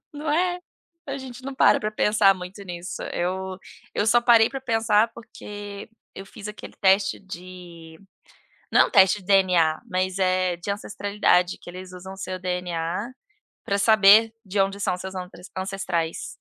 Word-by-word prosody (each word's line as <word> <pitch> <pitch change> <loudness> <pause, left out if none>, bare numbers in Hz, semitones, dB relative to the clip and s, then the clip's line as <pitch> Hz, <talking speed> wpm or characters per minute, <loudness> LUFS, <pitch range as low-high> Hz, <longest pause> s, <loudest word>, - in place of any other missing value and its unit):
Não 295 +1 -4
é? 355 +3 +1 0.5
A 275 0 -4
gente 255 -1 -10
não 275 0 -5
para - - +4
pra 215 - -2
pensar 210 -2 +3
muito 185 +2 -9
nisso, 175 0 -6
eu 185 +1 -3 0.4
eu 210 - 0
só 240 +2 +5
parei 230 -2 +5
para 270 -1 -5
pensar, 225 -2 +2
porque 205 -3 -9 0.3
eu 195 - -9
fiz 210 0 -9
aquele 210 - -10
teste 195 0 +3
de 175 -3 -11 0.7
não - - +5
teste 195 +1 +5
de - - -17
DNA, 180 -5 +3
mas 185 -1 -1
é 185 -1 +1
de 175 +4 -6
ancestralidade 200 -3 0
que 175 - -10
eles 185 0 -10
usam 190 +1 -9
o - - -14
seu 185 -1 -5
DNA, 180 +3 -3 0.5
pra 200 - 0
saber 215 +1 +6
de 195 +1 -3
onde 195 +1 -1
são 190 -3 0
seus 190 +1 -7
ante 180 -1 -8 0.2
ancestrais. 185 -4 -3
195 Hz, 160 wpm, -24 LUFS, 180-215 Hz, 0.7 s, saber